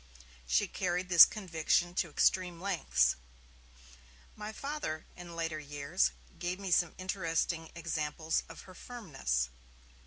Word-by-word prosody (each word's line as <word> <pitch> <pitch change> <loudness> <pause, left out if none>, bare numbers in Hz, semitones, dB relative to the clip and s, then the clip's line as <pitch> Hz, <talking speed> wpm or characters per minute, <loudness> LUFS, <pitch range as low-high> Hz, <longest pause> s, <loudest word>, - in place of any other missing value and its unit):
She 60 - +3
carried 180 0 -2
this 170 -2 +11
conviction 175 -2 0
to 175 -2 0
extreme 180 +2 +2
lengths. 165 - +2 1.2
My 210 0 -6
Father, 275 - -4
in 175 -1 -9
later 165 -2 -2
years, 140 - 0 0.3
gave 180 +2 -2
me 195 -2 -4
some 175 -1 +3
interesting 165 -3 -1
examples 160 -1 -1
of 165 - -10
her 185 - -13
firmness. 140 - -2
170 Hz, 120 wpm, -32 LUFS, 155-185 Hz, 1.2 s, this